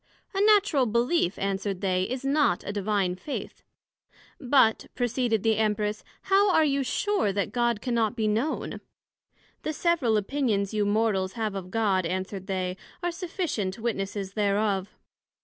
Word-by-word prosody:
A 390 Hz, -, 0 dB
Natural 405 Hz, -, +4 dB
Belief, 235 Hz, -, +1 dB
answered 195 Hz, -1 st, -2 dB
they, 185 Hz, -2 st, +1 dB
is 255 Hz, +4 st, -4 dB
not 275 Hz, -10 st, +2 dB
a 200 Hz, -, -4 dB
Divine 200 Hz, -2 st, 0 dB
Faith. 270 Hz, +10 st, -6 dB, 0.8 s
But, 255 Hz, -4 st, +3 dB
proceeded 245 Hz, -3 st, 0 dB
the 225 Hz, -1 st, +2 dB
Empress, 210 Hz, -1 st, 0 dB, 0.2 s
How 390 Hz, +1 st, +4 dB
are 320 Hz, -3 st, +4 dB
you 280 Hz, -1 st, +1 dB
sure 390 Hz, -, 0 dB
that 200 Hz, 0 st, -2 dB
God 240 Hz, -3 st, 0 dB
cannot 235 Hz, -2 st, 0 dB
be 220 Hz, -2 st, 0 dB
known? 230 Hz, +9 st, -1 dB, 0.8 s
The 310 Hz, -, -3 dB
several 305 Hz, -10 st, +2 dB
Opinions 210 Hz, -3 st, 0 dB
you 210 Hz, -1 st, +1 dB
Mortals 205 Hz, -3 st, +1 dB
have 220 Hz, -2 st, -2 dB
of 190 Hz, -2 st, -6 dB
God, 195 Hz, -4 st, +1 dB
answered 185 Hz, +2 st, -4 dB
they, 185 Hz, -1 st, -2 dB, 0.3 s
are 350 Hz, -, 0 dB
sufficient 335 Hz, -, -3 dB
witnesses 200 Hz, -4 st, -3 dB
thereof. 200 Hz, -2 st, +1 dB
220 Hz, 145 wpm, -27 LUFS, 195-265 Hz, 0.8 s, Natural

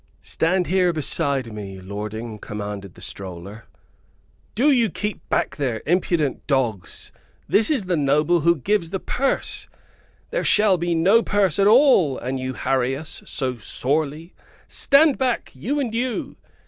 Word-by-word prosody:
"Stand 180 Hz, +2 st, 0 dB
here 180 Hz, 0 st, +2 dB
beside 140 Hz, -6 st, -1 dB
me, 100 Hz, -2 st, -7 dB
lording," 105 Hz, +3 st, -6 dB
commanded 105 Hz, -3 st, -6 dB
the 90 Hz, -, -13 dB
stroller. 95 Hz, +3 st, -8 dB, 0.9 s
"Do 275 Hz, +7 st, +4 dB
you 235 Hz, -5 st, +3 dB
keep 205 Hz, +3 st, -4 dB
back -, -, 0 dB
there, 125 Hz, -6 st, -2 dB
impudent 170 Hz, -3 st, 0 dB
dogs! 120 Hz, -, -2 dB, 0.4 s
This 215 Hz, -, +4 dB
is 265 Hz, -11 st, 0 dB
the 180 Hz, -1 st, 0 dB
noble 150 Hz, +4 st, +2 dB
who 170 Hz, +2 st, +3 dB
gives 170 Hz, +4 st, 0 dB
the 190 Hz, +2 st, -3 dB
purse. 270 Hz, +7 st, -2 dB, 0.6 s
There -, -, -1 dB
shall 205 Hz, -4 st, +4 dB
be 170 Hz, 0 st, 0 dB
no 195 Hz, +8 st, +4 dB
purse 205 Hz, -6 st, +1 dB
at 200 Hz, -, +5 dB
all, 215 Hz, -, +5 dB
an 130 Hz, +2 st, -4 dB
you 130 Hz, 0 st, -4 dB
harry 135 Hz, 0 st, 0 dB
us 155 Hz, +1 st, -7 dB
so 130 Hz, -4 st, -3 dB
sorely. 150 Hz, -, -2 dB, 0.3 s
Stand 285 Hz, 0 st, +3 dB
back, 255 Hz, -3 st, -1 dB
you 285 Hz, +4 st, -2 dB
and 245 Hz, -5 st, -2 dB
you!" 245 Hz, +1 st, -2 dB
160 Hz, 150 wpm, -22 LUFS, 125-205 Hz, 0.9 s, at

